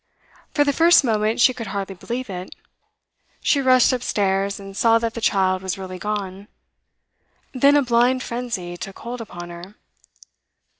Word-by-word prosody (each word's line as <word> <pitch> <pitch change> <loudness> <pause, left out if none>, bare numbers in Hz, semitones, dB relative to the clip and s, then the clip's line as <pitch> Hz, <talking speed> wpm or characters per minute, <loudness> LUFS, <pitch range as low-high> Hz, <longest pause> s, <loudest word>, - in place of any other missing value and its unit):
For 290 - +4
the 285 -1 +1
first 335 +2 +5
moment 220 -2 0
she 255 +2 +5
could 230 -3 -7
hardly 195 0 -4
believe 240 +7 -5
it. 185 -2 -7 0.8
She 280 - +2
rushed 255 -1 +4
upstairs, 200 -5 -1
and 195 0 -10
saw 230 +2 +4
that 230 0 -2
the 230 - -6
child 185 -3 +1
was 190 0 -3
really 185 -1 -7
gone; 200 -1 -4 1.1
then 275 +2 +4
a 285 - +3
blind 250 +1 +2
frenzy 230 -8 -5
took 195 +2 -8
hold 240 +1 -7
upon 175 -5 -9
her. 175 +4 -11
215 Hz, 155 wpm, -22 LUFS, 190-250 Hz, 1.1 s, first